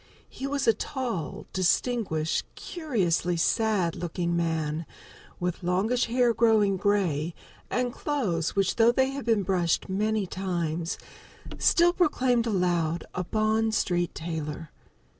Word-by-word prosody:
He 270 - -5
was 280 -2 -1
a 225 - +7
tall, 230 - -4
distinguished, 185 -4 +1
curiously 190 - -1
sad 195 -1 +1
looking 170 0 -2
man, 160 -2 -1 0.5
with 180 -1 -2
longish 190 +8 +1
hair 240 0 +2
growing 220 -4 +3
gray, 180 -5 0 0.3
and 245 -1 -1
clothes 205 - -1
which, 195 -2 +1
though 230 0 +6
they 265 +2 +2
had 275 0 -5
been 225 -4 +2
brushed 180 -3 0
many 210 +2 0
times, 170 -3 -2 0.6
still 345 0 +4
proclaimed 255 -9 +2
aloud 175 -5 0
a 180 - -2
Bond 220 +3 +1
Street 175 -4 0
tailor. 160 -1 -5
195 Hz, 120 wpm, -27 LUFS, 170-235 Hz, 0.6 s, a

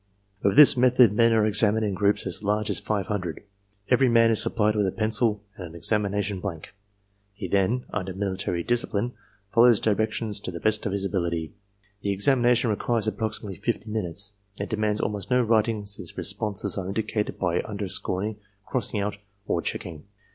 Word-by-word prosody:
With 100 - +1
this 150 0 +9
method 125 -3 +5
men 115 +2 +4
are 110 -2 +3
examined 110 +1 +2
in 100 - -1
groups 100 +2 +1
as - - 0
large 105 +1 0
as - - +2
five 105 -3 -2
hundred. 95 -6 -4 0.5
Every 130 0 +4
man 115 -1 +4
is 110 - +6
supplied 105 -1 +2
with 105 -2 +1
a - - -1
pencil 110 0 0
and 95 - -8
an 80 - -13
examination 100 +1 0
blank. 90 -5 -7 0.6
He 100 -2 -5
then, 100 +7 0
under 95 -2 -3
military 95 -3 -2
discipline, 120 0 -1 0.4
follows 115 -1 +6
directions 110 0 0
to 100 - -5
the 85 -2 -6
best 110 +2 +1
of - - -2
his 100 0 -2
ability. 85 -5 -2 0.5
The 100 - -2
examination 120 +2 +2
requires 115 +1 0
approximately 110 -2 -4
fifty 110 0 -3
minutes. 100 -1 -2 0.3
It - - -5
demands 105 -1 -1
almost 105 -1 -3
no 125 -1 +3
writing 110 -2 +1
since 100 0 -5
responses 100 -1 -1
are 90 - -5
indicated 105 +1 -2
by 90 -2 0
underscoring, 100 0 -3 0.3
crossing 115 -4 -1
out, 105 0 -3 0.3
or - - -1
checking. 80 -4 -5
105 Hz, 170 wpm, -25 LUFS, 100-110 Hz, 0.6 s, this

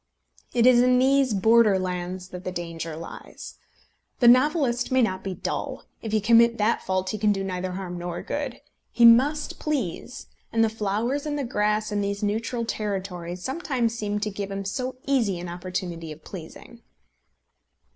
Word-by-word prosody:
It 235 -1 +3
is 250 -1 +7
in 250 0 +4
these 265 0 +3
border 220 0 +5
lands 180 0 -4
that 180 0 -8
the 185 - -3
danger 165 -2 -5
lies. 165 +1 -9 0.6
The 240 - +5
novelist 255 -1 +4
may 260 -1 +4
not 190 -4 -1
be 190 -1 -4
dull. - - -4 0.2
If 220 - -5
he 215 - +3
commit 230 +2 +5
that 215 +2 +1
fault 185 0 -1
he 215 - -4
can 210 0 +3
do 195 -1 -1
neither 185 -1 -3
harm 180 -2 -5
nor 175 0 -5
good. 285 -4 -4 0.3
He 235 0 +4
must 265 +6 +5
please, 260 - -3 0.3
and 225 0 +3
the 225 - +3
flowers 225 +7 -1
and 295 0 -2
the 285 - -1
grass 210 -3 0
in 205 0 0
these 200 +1 -2
neutral 230 +3 -1
territories 185 -5 -4
sometimes 260 -5 -1
seem 210 -2 -2
to 210 0 -1
give 200 0 -5
him 195 0 -4
so 255 +6 -3
easy 235 -9 +1
an 175 - -6
opportunity 175 -2 -5
of 155 +1 -11
pleasing! 190 +6 -10
210 Hz, 175 wpm, -25 LUFS, 185-245 Hz, 0.6 s, is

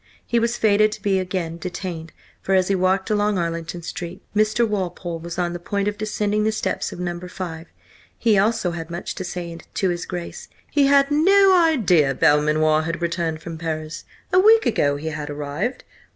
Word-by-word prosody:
He 235 - +1
was 235 +1 0
fated 215 0 +3
to 215 - -9
be 195 -2 +2
again 180 -3 -3
detained, 175 -2 -6 0.3
for 195 - +1
as 185 0 +2
he - - +3
walked 190 +2 +1
along 210 -1 +1
Arlington 170 0 -3
Street, 175 +2 -7
Mr. 215 +2 +2
Walpole 180 -4 -3
was 170 +1 -7
on 175 -1 -1
the 175 - -5
point 200 +3 -2
of 205 - -1
descending 210 0 -1
the 220 - +2
steps 215 - -2
of - - -9
No. 175 -1 -3
5. 175 -2 -7 0.5
He 225 -3 +3
also 200 -2 +2
had 165 -1 -6
much 170 +1 -5
to 185 - -5
say 175 -1 -5 0.2
to 190 - +1
his 175 -1 -3
Grace. 175 -2 -6 0.2
He 285 -2 +3
had 280 0 +4
no 385 +5 +5
idea 235 - +4
that - - -17
Belmanoir 155 +1 +3
had 165 +2 -3
returned 170 -2 -2
from 165 -2 -7
Paris. 155 -1 -4 0.3
A 370 - +6
week 445 +3 +6
ago 145 -10 +2
he 155 +3 -4
had 155 -1 -5
arrived? 145 - -3
180 Hz, 195 wpm, -22 LUFS, 165-215 Hz, 0.5 s, A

